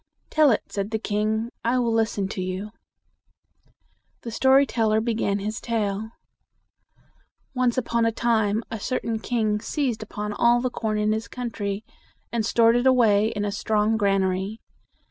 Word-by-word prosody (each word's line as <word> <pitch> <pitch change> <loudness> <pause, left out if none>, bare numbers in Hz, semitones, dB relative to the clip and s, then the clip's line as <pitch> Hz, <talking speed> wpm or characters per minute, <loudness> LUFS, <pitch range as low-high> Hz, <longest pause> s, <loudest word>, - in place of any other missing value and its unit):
"Tell 305 -2 +5
it," 225 - +2
said 200 0 -3
the 220 - -1
king. 215 +2 -1
"I 240 +2 +1
will 235 -2 +1
listen 220 -3 0
to 195 - -4
you." 185 +3 -4 1.5
The 230 - -5
story 265 +4 +4
teller 220 -4 +1
began 220 -3 0
his 210 +2 -4
tale. 220 -2 -2 1.4
"Once 250 -2 +1
upon 235 -2 +1
a - - +2
time 220 -2 +1
a 225 - -4
certain 230 0 -2
king 215 -3 0
seized 245 -2 -2
upon 210 -1 -5
all 235 +3 +4
the 250 0 -1
corn 215 -2 -2
in 210 0 +1
his 220 +1 -2
country, 215 -4 -4 0.5
and 235 -2 0
stored 230 +1 +4
it 245 +2 +2
away 220 -5 +4
in 205 -2 -2
a 205 - -1
strong 215 +1 +1
gran 200 -3 +2
a 190 - +2
ry. 190 +4 -3
220 Hz, 165 wpm, -24 LUFS, 210-235 Hz, 1.5 s, Tell